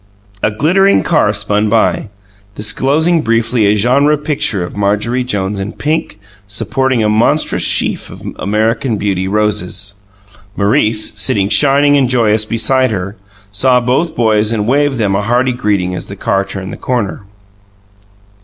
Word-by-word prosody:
A - - +2
glittering 180 - +2
car 150 -11 +2
spun 105 +1 0
by, 110 -1 +1 0.5
disclosing 150 +10 +1
briefly 115 -2 +1
a 105 - +3
genre 135 +8 +2
picture 140 - -2
of 85 - -8
Marjorie 105 +5 0
Jones 100 -4 -3
in 100 +3 -5
pink, 155 -7 -3 0.3
supporting 125 +4 -1
a - - +2
monstrous 115 +8 +1
sheaf - - +2
of - - -12 0.2
American 110 +3 0
Beauty 95 -2 -2
roses. 100 -1 -2 0.6
Maurice, 105 +1 +1
sitting 100 0 +1
shining 145 +3 +4
and 130 -3 +1
joyous 110 -3 +2
beside 130 +4 +1
her, 100 -1 -4 0.4
saw 125 +5 +2
both 130 +7 -1
boys 110 -2 +1
and 105 -2 -1
waved 140 +1 +1
them 100 -4 0
a 100 - 0
hearty 125 +4 +1
greeting 100 -6 -1
as 90 - -5
the - - -8
car 95 0 0
turned 95 -1 -7
the - - -8
corner. 120 -6 -3
110 Hz, 145 wpm, -14 LUFS, 105-130 Hz, 0.6 s, shining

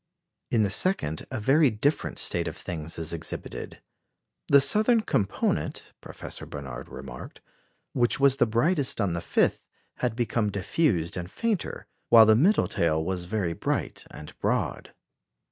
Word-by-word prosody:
In 110 -2 +2
the 100 - 0
second 100 - 0
a - - -4
very 140 +6 +4
different 130 +7 -1
state 85 -1 +1
of 80 +1 -6
things 80 -3 -6
is 80 0 -3
exhibited. 80 -1 -6 0.6
"The 140 - +7
southern 215 - +3
component," 100 - -2
Professor - - -8
Barnard 65 -3 -8
remarked, 65 -2 -9 0.5
"which 120 0 +2
was 135 -1 +4
the - - +3
brightest 140 +5 +1
on 100 -5 0
the 85 - -2
5th, - - +1 0.4
had 120 -3 -1
become 115 -3 0
diffused 100 - 0
and 90 0 -5
fainter, 220 - -3 0.2
while 115 -1 +9
the 110 0 +5
middle 180 - +3
tail 80 -1 0
was 90 -1 -3
very 90 -3 -2
bright - - -3
and 75 - -11
broad. - - -2
105 Hz, 145 wpm, -26 LUFS, 85-140 Hz, 0.6 s, while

